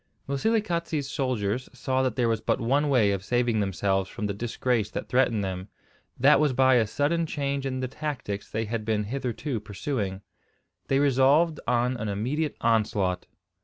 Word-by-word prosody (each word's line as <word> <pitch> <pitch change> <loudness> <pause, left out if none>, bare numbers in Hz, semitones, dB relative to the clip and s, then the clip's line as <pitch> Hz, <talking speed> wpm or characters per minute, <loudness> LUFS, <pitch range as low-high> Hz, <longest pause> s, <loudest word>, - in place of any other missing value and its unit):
Moselekatse's 170 -2 0
soldiers 130 -4 -1
saw 130 0 -1
that 130 -3 0
there 125 -2 +2
was 115 -1 0
but - - 0
one 140 +5 +1
way 115 -7 +4
of 100 -1 -2
saving 120 0 +1
themselves 95 -1 0
from 105 - -5
the 100 - -1
disgrace 115 0 -1
that - - -5
threatened 120 -5 +2
them; 95 0 -4 0.5
that 140 +3 +6
was 150 -3 +2
by 130 +1 +4
a 115 -4 +4
sudden 155 +8 0
change 140 -2 -2
in 130 -1 -3
the 130 - -1
tactics 125 -8 -5
they 115 +1 -2
had 110 0 -3
been 105 -1 0
hitherto 125 +2 -3
pursuing. 100 -2 -3 0.7
They 135 - +2
resolved 145 +4 +4
on 125 +1 +1
an 110 -2 -3
immediate 135 +10 -2
onslaught. 105 -5 +1
125 Hz, 165 wpm, -26 LUFS, 105-140 Hz, 0.7 s, that